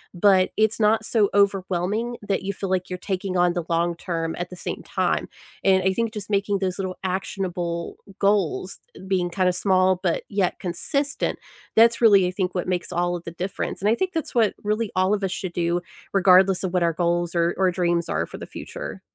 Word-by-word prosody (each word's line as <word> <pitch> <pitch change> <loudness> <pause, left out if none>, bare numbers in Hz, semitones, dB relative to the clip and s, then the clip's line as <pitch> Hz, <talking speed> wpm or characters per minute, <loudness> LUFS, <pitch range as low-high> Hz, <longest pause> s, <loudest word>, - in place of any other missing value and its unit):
But 185 0 +4
it's 220 +1 +1
not 215 +1 +3
so 215 -4 +2
overwhelming 200 +3 +1
that 200 -2 -2
you 200 +1 -2
feel 195 0 -5
like 185 -1 0
you're 180 - -4
taking 190 -1 -3
on 175 0 +3
the 175 -1 -2
long-term 170 -1 -1
at 175 +1 -5
the - - -7
same - - -5
time. - - -1 0.4
And 190 -1 +4
I 190 0 +2
think 230 +1 -1
just 210 -2 -6
making 200 -1 +1
those 185 -2 -2
little 185 -2 -4
actionable 180 -2 -3 0.2
goals, 210 - +1 0.2
eh - - -12
being 185 -2 +1
kinda 185 0 +2
small 185 -1 +2
but 175 -3 +1
yet 195 -3 0
consistent, 275 - -2 0.4
that's 230 +1 +6
really, 200 -5 +6
I - - -2
think, 185 -1 -2
what 180 - -2
makes 180 -2 -2
all 175 0 0
of 175 - -6
the 170 - -6
difference, 180 +3 -4
and 205 - +2
I 225 - +4
think 375 +7 -2
that's 320 -5 -3
what 220 -4 +3
really 215 +1 -1
all 185 +2 +3
of 200 - -5
us 190 - 0
should 185 -2 -4
do 170 +1 0 0.3
regardless 190 -1 +5
of 185 -1 -2
what 180 - +2
our 170 -1 +2
goals 175 0 0
or 170 0 +2
or 185 -1 +3
dreams 175 -1 0
are 80 +2 0
for - - -9
the - - -7
future. - - -8
185 Hz, 210 wpm, -24 LUFS, 175-200 Hz, 0.4 s, that's